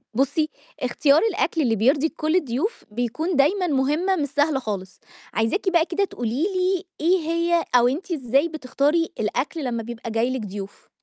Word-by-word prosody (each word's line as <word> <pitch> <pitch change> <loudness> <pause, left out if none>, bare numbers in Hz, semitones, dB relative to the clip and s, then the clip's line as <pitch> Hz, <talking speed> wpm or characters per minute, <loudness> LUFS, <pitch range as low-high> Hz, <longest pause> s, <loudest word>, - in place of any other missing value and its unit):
بُصّي، 285 +4 +1 0.3
اختيار 280 +4 +3
الأكل 340 -4 0
اللي 235 -6 +2
بيرضي 270 +8 +3
كُلّ 310 +1 -1
الضيوف 325 - -1
بيكون 245 - -2
دايمًا 355 +7 +3
مهمة 300 +7 +1
مش 295 -5 -1
سهلة 290 0 +1
خالص، 195 -6 -5 0.3
عايزاكِ 230 - +1
بقى 340 -3 +3
كده 365 +3 0
تقولي 245 - -3
لي 375 -1 0 0.2
إيه 355 +4 +3
هي 335 +1 +1
أو 245 0 +6
أنتِ 315 +9 -3
إزاي 275 0 +1
بتختاري 305 +2 0
الأكل 255 +9 -2
لمّا 235 -3 -2
بيبقى 230 0 -7
جاي 225 +2 +1
لِك 260 - -3
ضيوف؟ 200 -1 -8
290 Hz, 165 wpm, -23 LUFS, 245-335 Hz, 0.3 s, أو